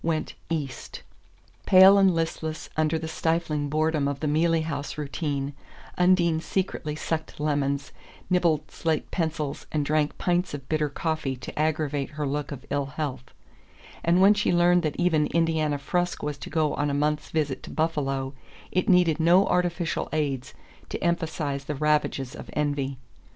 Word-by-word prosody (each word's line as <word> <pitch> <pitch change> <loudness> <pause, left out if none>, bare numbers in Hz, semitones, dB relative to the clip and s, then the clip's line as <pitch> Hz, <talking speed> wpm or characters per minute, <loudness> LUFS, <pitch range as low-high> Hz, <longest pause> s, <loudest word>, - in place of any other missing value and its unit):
went 160 -1 -1 0.2
"east." 145 -5 -4 0.6
Pale 190 +1 +8
and 190 -3 +4
listless 160 -1 -3
under 155 +1 +1
the 160 0 -5
stifling 160 -2 -1
boredom 155 -1 +1
of 140 -1 -2
the 155 - -3
Mealey 160 +2 +2
House 145 -2 -4
routine, 145 -1 -3 0.4
Undine 180 -3 +3
secretly 165 -4 -2
sucked 160 0 -4
lemons, 145 -2 -1 0.4
nibbled 170 -5 +1
slate 160 -2 -2
pencils 155 -4 -2
and 150 -2 0
drank 150 0 +1
pints 175 -2 0
of 135 -2 -9
bitter 155 -1 0
coffee 155 -2 -2
to 130 - -8
aggravate 150 -2 0
her 150 - -1
look 145 +1 -2
of 140 -1 -7
ill 140 -1 0
health; 140 -3 -4 0.8
and 170 +2 +3
when 195 +2 +7
she 210 0 +1
learned 175 0 +4
that 155 -3 -2
even 165 -4 +2
Indiana 160 -3 +1
Frusk 175 +4 -1
was 145 -1 -3
to - - -7
go 155 -2 +1
on 145 0 0
a 140 - -1
month's 150 +1 0
visit 145 -5 -1
to - - -10
Buffalo 135 -4 -1 0.4
it 185 - 0
needed 175 -4 +4
no 175 +4 +5
artificial 175 -2 0
aids 140 -5 -2 0.3
to - - -3
emphasize 155 -5 -1
the 150 - -3
ravages 150 -3 0
of - - -10
envy. 145 -2 -1
155 Hz, 160 wpm, -26 LUFS, 145-165 Hz, 0.8 s, Pale